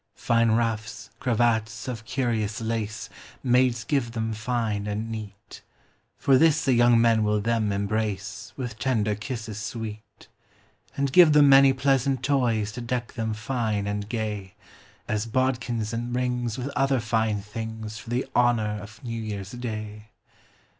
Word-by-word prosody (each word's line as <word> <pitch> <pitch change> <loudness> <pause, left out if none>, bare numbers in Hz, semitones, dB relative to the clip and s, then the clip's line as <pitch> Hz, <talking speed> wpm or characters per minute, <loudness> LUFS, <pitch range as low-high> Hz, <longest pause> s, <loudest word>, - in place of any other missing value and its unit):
Fine 115 -1 +2
ruffs, 110 -1 -2
cravats 115 -2 0
of 115 -3 -5
curious 120 -4 -1
lace, 110 -1 -3 0.4
Maids 125 -2 +3
give 125 -5 -1
them 110 -1 -2
fine 110 -2 -2
and 110 +2 -3
neat; 105 -3 -8 0.6
For 135 -2 +4
this 160 0 +4
the 135 - +4
young 120 -1 +5
men 115 -1 +4
will 105 0 +2
them 110 -1 0
embrace 100 0 -2
With 125 -5 -5
tender 110 -3 +1
kisses 110 -1 -5
sweet: 110 -1 -7 0.7
And 140 -1 0
give 170 -2 +8
them 145 -1 +7
many 135 0 +8
pleasant 135 -1 +1
toys 120 -6 +1
To 120 +3 -7
deck 120 0 -3
them 110 -1 -2
fine 110 -3 -1
and 100 0 -3
gay, 105 -4 -4 0.5
As 110 +1 -1
bodkins 120 -2 -1
and 120 +1 -3
rings 125 -2 -1
with 130 +2 -3
other 135 -1 +1
fine 110 -2 0
things 110 +1 -6
For 120 0 -11
the 120 +2 0
honor 110 -4 +2
of 110 +4 -12
New 115 -2 -4
Year's 100 -3 -5
day. 110 -3 -6
115 Hz, 145 wpm, -26 LUFS, 110-125 Hz, 0.7 s, give